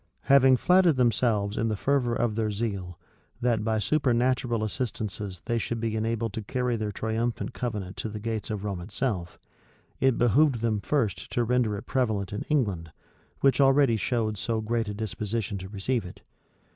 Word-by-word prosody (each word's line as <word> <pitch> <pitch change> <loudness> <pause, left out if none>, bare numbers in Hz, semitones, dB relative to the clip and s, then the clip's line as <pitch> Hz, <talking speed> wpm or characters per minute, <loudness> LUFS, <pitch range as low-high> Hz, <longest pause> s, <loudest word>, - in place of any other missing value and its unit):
Having 135 -1 +6
flattered 180 +1 +4
themselves, 115 -4 +1
in 115 - +1
the 110 - 0
fervor 125 +1 +1
of 120 -2 0
their 110 0 0
zeal, 100 -5 -3 0.4
that 120 -3 +1
by 110 0 +1
supernatural 125 -1 +1
assistances 105 -4 -4
they 115 -1 0
should 115 +1 -3
be 110 -1 -1
enabled 115 0 -1
to 110 - -3
carry 125 +3 -1
their 110 -2 -2
triumphant 115 +4 -2
covenant 105 -7 -4
to 110 - -3
the 105 0 -6
gates 110 0 -3
of 105 -2 -3
Rome 100 -4 -3
itself, 100 -2 -3 0.6
it 130 -1 +3
behoved 120 +1 +3
them 110 -2 +1
first 105 - -1
to 120 - +2
render 115 -3 +1
it 100 - -8
prevalent 110 -7 -1
in 105 - -3
England, 100 - 0 0.5
which 135 +1 +4
already 135 -3 +5
showed 110 -2 -1
so 115 +2 -1
great 115 +1 -1
a 105 - -3
disposition 105 -1 -3
to 95 0 -8
receive 110 +4 -1
it. 90 - -11
115 Hz, 170 wpm, -27 LUFS, 105-125 Hz, 0.6 s, Having